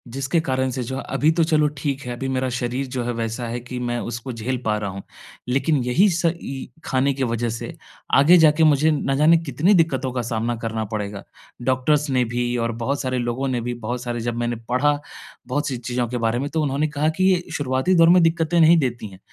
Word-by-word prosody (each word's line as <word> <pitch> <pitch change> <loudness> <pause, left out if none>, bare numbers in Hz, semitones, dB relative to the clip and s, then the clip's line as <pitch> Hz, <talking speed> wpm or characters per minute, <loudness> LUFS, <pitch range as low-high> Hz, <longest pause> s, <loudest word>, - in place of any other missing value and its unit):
जिसके 135 +4 0
कारण 130 -3 -1
से 125 0 -3
जो 130 +3 -5
है, - - -5
अभी 155 +2 +2
तो 165 0 +2
चलो 155 -2 +3
ठीक 135 0 -2
है, 125 - -4
अभी 135 +2 -4
मेरा 130 -1 -1
शरीर 125 +3 -2
जो 125 - -1
है 120 - -2
वैसा 115 +1 -3
है 120 +1 -4
कि 125 +1 -8
मैं 120 -1 -2
उसको 120 +2 -5
झेल 120 +3 -3
पा 105 -1 +1
रहा 105 -1 -3
हूँ। 95 +1 -7 0.4
लेकिन 135 +4 +1
यही 125 +12 +3
स 175 -1 -1 0.2
इ 135 -1 -6 0.2
खाने 135 +2 +1
की 135 0 -2
वज़ह 115 -1 -1
से, 115 - -5 0.4
आगे 160 +6 +7
जाके 160 0 +5
मुझे 155 0 +4
ना 135 -2 0
जाने 155 +4 +5
कितनी 160 +5 +1
दिक्कतों 160 -7 +1
का 125 - -1
सामना 115 +1 -1
करना 110 -1 -2
पड़ेगा। 100 -1 -4 0.4
डॉक्टर्स 135 +4 +1
ने 130 -2 +2
भी 120 0 0
और 115 0 -1
बहुत 140 +4 -1
सारे 130 -1 -2
लोगों 120 +3 -2
ने 125 -2 -1
भी, 120 +1 -3
बहुत 120 +1 -4
सारे 120 -1 -3
जब 120 - -4
मैंने 120 0 -1
पढ़ा, 145 +4 +2 0.5
बहुत 145 +3 -1
सी 130 - -2
चीज़ें 120 +1 -2
के 125 - -3
बारे 115 0 0
में, 140 +2 -3
तो 160 - -1
उन्होंने 145 +1 0
कहा 150 +2 +2
कि - - +3
ये 180 - 0 0.2
शुरुआती 130 +6 +1
दौर 165 -1 +6
में 180 +1 +6
दिक्कतें 165 +1 +2
नहीं 165 +1 +6
देती 120 -6 -2
हैं। 95 - -14
130 Hz, 235 wpm, -22 LUFS, 120-150 Hz, 0.5 s, आगे